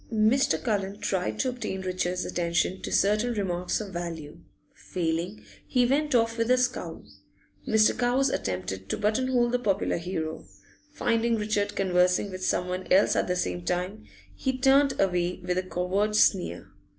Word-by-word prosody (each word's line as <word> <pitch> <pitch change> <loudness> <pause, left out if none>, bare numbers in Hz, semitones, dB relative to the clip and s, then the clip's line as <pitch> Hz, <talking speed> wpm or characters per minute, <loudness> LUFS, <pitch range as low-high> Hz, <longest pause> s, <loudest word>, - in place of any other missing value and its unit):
Mr. 220 -5 +3
Cullen 200 -4 -1
tried 195 -3 -2
to 260 - 0
obtain 235 -6 -4
Richard's 185 -1 -2
attention 170 +1 -1
to - - -5
certain 215 +4 +2
remarks 180 -3 -1
of 205 -3 -7
value; 165 -4 -6 0.3
failing, 170 +3 -3 0.2
he 250 -2 +3
went 285 +2 +1
off 230 0 +2
with 230 +1 +1
a 255 - +5
scowl. 250 0 -2 0.6
Mr. 220 -1 +4
Cowes 255 +2 +2
attempted 95 +1 -3
to - - -1
button 215 +5 +1
hole 245 -2 +2
the 250 - +1
popular 200 -5 0
hero; 165 -2 -4 0.5
finding 235 -4 +1
Richard 210 -1 -1
conversing 180 +1 +2
with 185 0 -6
someone 180 +1 -1
else 190 +2 +4
at - - +1
the 180 - 0
same 90 - -2
time, 180 - -2 0.3
he 260 -1 -2
turned 270 +1 +4
away 180 -2 +1
with 180 0 0
a - - 0
covert 185 +3 -1
sneer. 180 - +2
195 Hz, 160 wpm, -27 LUFS, 180-235 Hz, 0.6 s, a